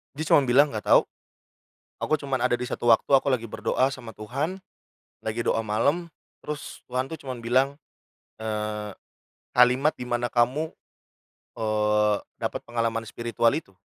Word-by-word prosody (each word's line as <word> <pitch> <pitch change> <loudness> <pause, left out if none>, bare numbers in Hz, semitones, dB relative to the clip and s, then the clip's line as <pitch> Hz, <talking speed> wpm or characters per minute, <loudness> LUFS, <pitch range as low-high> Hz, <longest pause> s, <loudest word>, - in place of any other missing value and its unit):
Dia 155 - -3
cuman 140 - +6
bilang, 135 +4 +5
"Enggak 110 -5 -5
tahu. - - +8 1.0
Aku 155 - +1
cuman 135 -3 -2
ada 125 -1 +2
di 125 - -3
1 120 0 0
waktu, 115 - +5
aku 135 +1 +4
lagi 120 -3 0
berdoa 110 +4 0
sama 130 -4 -8
Tuhan, 140 - -3 0.6
lagi 110 +2 -3
doa 115 - +2
malam, 140 +11 0 0.3
terus 150 -1 -6
Tuhan 125 +1 0
tuh, 160 - -6
cuman 130 -3 -6
bilang, 130 +4 +2 0.6
eee, 105 -1 -3 0.6
kalimat 125 +5 +5
dimana 120 -1 -2
kamu, 130 +7 +1 0.9
eee, 105 -1 +2 0.2
dapat - - -3
pengalaman 115 -1 -1
spiritual 115 0 +1
itu. 155 -11 -6
120 Hz, 145 wpm, -26 LUFS, 110-135 Hz, 1.0 s, tahu